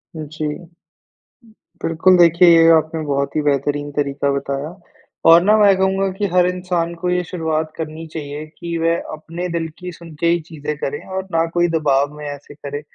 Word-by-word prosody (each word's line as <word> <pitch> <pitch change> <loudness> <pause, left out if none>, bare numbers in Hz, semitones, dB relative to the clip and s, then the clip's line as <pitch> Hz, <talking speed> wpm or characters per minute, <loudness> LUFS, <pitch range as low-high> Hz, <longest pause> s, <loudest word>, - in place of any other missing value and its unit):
जी। 155 +1 -5 1.1
बिल्कुल, 165 +3 +3
देखिए 170 +1 +6
ये 165 -1 +7
आपने 160 +1 -2
बहुत 140 0 -1
ही 155 - +2
बेहतरीन 145 0 -1
तरीका 140 -1 -1
बताया 140 +1 -3 0.6
और 165 +1 +8
ना, 210 +4 +4
मैं 205 -2 +5
कहूँगा 190 +1 +1
कि 205 - 0
हर 180 -1 +4
इंसान 180 -2 -2
को 180 +1 -3
ये 180 0 +1
शुरुआत 160 -2 -2
करनी 160 0 -6
चाहिए 150 0 -6
कि 170 -1 -4
वह 165 +1 +1
अपने 165 +3 -6
दिल 165 -1 -2
की 180 -1 -6
सुन 170 -1 -12
के 170 - +1
ही 170 +1 +3
चीज़ें 150 -1 -5
करें 145 0 -3
और 190 0 -4
ना 165 -1 +2
कोई 175 0 +3
दबाव 145 -2 +1
में 150 - -8
ऐसे 145 0 -8
करे। 145 0 -6
165 Hz, 180 wpm, -19 LUFS, 150-175 Hz, 1.1 s, और